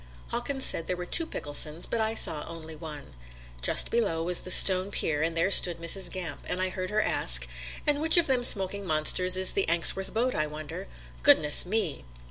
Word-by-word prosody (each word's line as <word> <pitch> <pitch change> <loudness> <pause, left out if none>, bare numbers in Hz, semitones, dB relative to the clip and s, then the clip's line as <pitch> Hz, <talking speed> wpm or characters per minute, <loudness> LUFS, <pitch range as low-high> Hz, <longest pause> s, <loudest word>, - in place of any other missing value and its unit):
Hawkins 265 +3 -3
said 165 - -1
there 180 - -5
were 180 - -9
two 330 - 0
Picklesons, 150 - -3
but 230 - -5
I 220 0 -3
saw 150 -8 +2
only 160 -1 -12
one. 150 - -12 0.5
Just - - +1
below 200 -9 -3
was 180 +1 0
the - - -9
Stone 185 +1 +5
pier 150 -6 -3
and 165 +1 -4
there 170 +4 -2
stood 175 -3 +3
Mrs. 170 +3 0
Gamp, 180 -4 -9
and 180 - -3
I 185 0 -3
heard 185 0 -8
her 215 +1 -3
ask: - - 0 0.4
"And 295 0 -1
which 320 +2 +7
of 340 - +2
all 270 - +1
them 245 - -6
smoking 200 -3 +2
monsters 180 +2 +2
is 185 0 +4
the 195 - -4
Anxworks 170 +3 +4
boat, 245 +3 -3
I 155 0 -4
wonder? 150 - -11 0.3
Goodness 150 - +3
me!" 200 -7 -5
180 Hz, 205 wpm, -24 LUFS, 160-210 Hz, 0.5 s, which